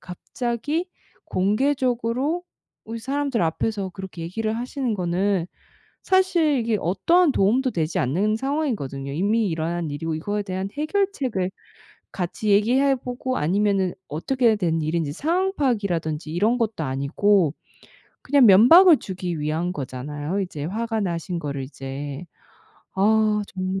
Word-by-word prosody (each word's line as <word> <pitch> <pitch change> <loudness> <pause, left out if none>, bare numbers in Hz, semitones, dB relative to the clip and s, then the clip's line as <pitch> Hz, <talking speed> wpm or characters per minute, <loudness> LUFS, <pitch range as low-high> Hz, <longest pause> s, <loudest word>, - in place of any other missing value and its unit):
갑자기 240 - -3 0.4
공개적으로 255 - 0 0.5
으 230 - -4
사람들 275 -2 -1
앞에서 190 +4 -1
그렇게 190 -2 -8
얘기를 215 +6 -2
하시는 250 -1 -2
거는 180 0 0 0.6
사실 350 -7 +3
이게 225 -2 0
어떠한 285 - +3
도움도 245 +7 +2
되지 160 -1 -1
않는 195 - +1
상황이거든요. 225 - -2
이미 205 +6 +1
일어난 165 0 -2
일이고 160 +2 -3
이거에 205 +6 -2
대한 190 0 -4
해결책을 295 - -1 0.6
같이 190 +4 -3
얘기해 255 +7 +4
보고 255 +1 -4
아니면은 195 +2 +1 0.2
어떻게 230 - +1
된 165 -4 0
일인지 155 -1 -1
상황 360 - 0
파악이라든지 175 - -1
이런 215 +7 +2
것도 220 -8 -1
아니고 150 +6 +2 0.7
그냥 270 -3 +5
면박을 300 - +8
주기 180 -3 -5
위한 160 +4 -1
거잖아요, 145 +5 -4
이제 155 -6 -4
화가 225 +5 -2
나신 175 -2 -2
거를 140 -4 -4
이제. 135 +3 -7 0.7
아 210 +1 +3
정말. 185 +1 -2
200 Hz, 310 characters per minute, -23 LUFS, 170-250 Hz, 0.7 s, 면박을